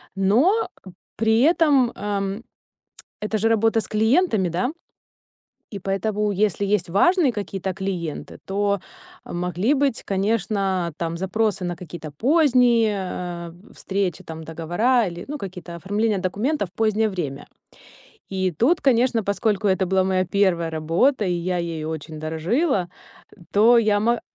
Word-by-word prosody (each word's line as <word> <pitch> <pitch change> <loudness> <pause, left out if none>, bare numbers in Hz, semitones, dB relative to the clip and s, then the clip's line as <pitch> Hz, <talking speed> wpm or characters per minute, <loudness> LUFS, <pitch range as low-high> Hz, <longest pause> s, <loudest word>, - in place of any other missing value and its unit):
Но, 205 - +4 0.7
при 225 +1 +3
этом, 290 -5 +4
эм, 200 +1 -3 0.8
это 210 +1 -1
же 225 - +2
работа 225 0 +3
с - - -9
клиентами, 220 - +2
да. 180 - -1 1.0
И - - -3
поэтому, 205 +2 -1
если 200 0 0
есть 200 -4 0
важные 305 - +3
какие-то 195 -3 -4
клиенты, 180 -5 -4
то 200 0 0 0.4
могли 180 - -1
быть, 275 -4 0
конечно, 195 -3 0
там 165 0 -2
запросы 195 +2 -1
на 175 -1 -3
какие-то 165 -2 -8
поздние, 240 - +3 0.5
э, 180 +8 -18
встречи, 190 -3 -2
там 160 0 -8
договора 175 +10 +1
или, 175 0 -6
ну, 295 +1 -4
какие-то 180 -4 -8
оформления 205 +4 0
документов 205 - -1
в - - -33
позднее 220 0 +2
время. 155 -9 -5 0.8
И 190 -1 -1
тут, 245 - +2
конечно, 245 -3 +2
поскольку 205 0 0
это 190 0 +1
была 190 +1 +2
моя 185 -1 +1
1 180 -3 +1
работа, 165 - +1
и 180 - 0
я 175 +1 -1
ею 165 -2 -4
очень 155 0 -6
дорожила, 175 - 0 0.6
то 230 +4 +6
я 210 -2 +2
мо 235 +2 +1
200 Hz, 135 wpm, -23 LUFS, 180-225 Hz, 1.0 s, то